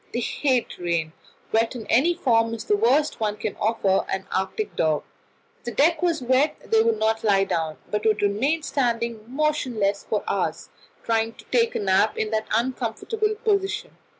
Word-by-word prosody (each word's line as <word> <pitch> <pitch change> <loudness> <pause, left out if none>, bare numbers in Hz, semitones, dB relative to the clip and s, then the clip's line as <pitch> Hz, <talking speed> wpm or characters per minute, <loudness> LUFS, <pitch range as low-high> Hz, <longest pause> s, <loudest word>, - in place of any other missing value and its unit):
They - - +1
hate 255 0 0
rain; 170 -2 -1 0.4
wet 225 +3 +1
in 225 -3 -6
any 325 +9 +3
form 230 -8 +2
is 225 - -7
the 420 - +3
worst 310 -9 +2
one 210 -1 -1
can 215 -1 -4
offer 205 -3 +1
an 190 0 -2
Arctic 190 - -2
dog. 155 -2 +1 0.6
If - - -32
the 240 - -3
deck 320 +7 +3
was 335 -6 0
wet, 260 +5 +2 0.2
they 220 0 +5
would 225 -1 +2
not 220 +1 0
lie 200 -3 +4
down, 160 -5 -2
but 210 0 -1
would 215 -1 +2
remain 265 +11 +1
standing 235 -5 -1
motionless 250 -8 0
for - - 0
hours, - - -2 0.3
trying 225 0 0
to - - -15
take 470 -1 +2
a - - 0
nap 200 +2 +2
in 215 0 -1
that 220 0 -1
uncomfortable 260 - -1
position. 420 +1 0
230 Hz, 180 wpm, -24 LUFS, 210-300 Hz, 0.6 s, they